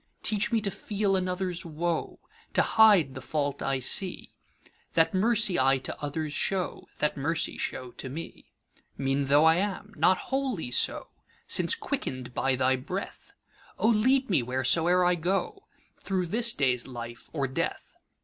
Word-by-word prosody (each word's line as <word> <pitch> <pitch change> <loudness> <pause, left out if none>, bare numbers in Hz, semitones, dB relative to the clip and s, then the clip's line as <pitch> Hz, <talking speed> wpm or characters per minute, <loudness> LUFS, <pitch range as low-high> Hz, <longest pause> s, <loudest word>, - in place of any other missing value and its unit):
Teach 215 +2 0
me 225 -2 +2
to 200 -1 -2
feel 200 +1 -1
another's 185 -1 -2
woe, 165 +1 -3 0.4
To - - +4
hide 205 -11 +5
the 130 - -8
fault 145 0 -2
I 135 0 0
see:That 165 +2 -2
mercy 215 - +3
I 135 +1 +4
to 130 - -7
others 150 +1 -3
show, 190 +2 -1
That 150 - 0
mercy 150 +3 -1
show 125 -1 -4
to 130 - -7
me. 160 +6 -9 0.5
Mean 135 +1 0
tho' 145 +3 +4
I 160 +1 +5
am, 205 +2 -3
not 185 - +3 0.2
wholly 255 - -2
so, - - +1 0.4
Since - - +2
quicken'd 130 -1 -4
by 135 +1 +1
thy 130 +1 +2
breath;O 190 - -5
lead 255 +5 +3
me, 180 -10 +2
whereso'er 160 +9 +3
I 180 - +4
go, 195 - -2 0.3
Thro' 185 -2 -2
this 230 +6 +3
day's 125 -3 0
life 120 -2 -9
or 140 -4 -1
death! 130 - -4
170 Hz, 150 wpm, -27 LUFS, 135-200 Hz, 0.5 s, hide